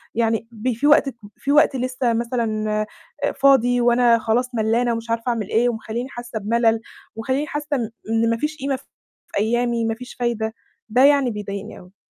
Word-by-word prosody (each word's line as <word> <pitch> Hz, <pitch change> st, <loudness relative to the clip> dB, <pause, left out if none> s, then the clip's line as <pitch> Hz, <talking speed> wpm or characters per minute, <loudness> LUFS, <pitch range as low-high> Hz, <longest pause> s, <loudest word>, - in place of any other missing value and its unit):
يعني 225 Hz, -1 st, 0 dB
ب 235 Hz, +3 st, -2 dB
في 260 Hz, +6 st, 0 dB
وقت 280 Hz, -3 st, +4 dB, 0.2 s
في 280 Hz, -, -2 dB
وقت 295 Hz, -1 st, +5 dB
لسه 255 Hz, -1 st, 0 dB
مثلًا، 225 Hz, -2 st, -1 dB, 0.6 s
آآ، -, -, +1 dB
فاضي 245 Hz, -3 st, +4 dB
وأنا 240 Hz, -1 st, +4 dB
خلاص 240 Hz, +3 st, 0 dB
ملّانة 230 Hz, +2 st, +1 dB
ومش 230 Hz, 0 st, -5 dB
عارفة 230 Hz, +2 st, -1 dB
أعمل 225 Hz, -4 st, -2 dB
إيه، 240 Hz, +2 st, +3 dB
ومخلّيني 235 Hz, +2 st, -4 dB
حاسة 240 Hz, -3 st, -6 dB
بملل، 225 Hz, +2 st, +2 dB, 0.4 s
ومخليني 260 Hz, +6 st, -1 dB
حاسة 295 Hz, 0 st, -4 dB
إن 235 Hz, -5 st, -2 dB, 0.2 s
إن 225 Hz, 0 st, +2 dB
ما 230 Hz, -, +1 dB
فيش 300 Hz, +4 st, -3 dB
قيمة 275 Hz, -1 st, -1 dB
في 260 Hz, -, -11 dB, 0.5 s
أيامي، 235 Hz, +2 st, +1 dB
ما 225 Hz, 0 st, -1 dB
فيش 250 Hz, +2 st, -10 dB
فايدة، 225 Hz, -2 st, -1 dB, 0.4 s
ده 250 Hz, +5 st, +4 dB
يعني 280 Hz, -3 st, +5 dB
بيضايقني 200 Hz, -1 st, -6 dB
أوي. 180 Hz, +1 st, -17 dB
235 Hz, 180 wpm, -22 LUFS, 225-255 Hz, 0.6 s, وقت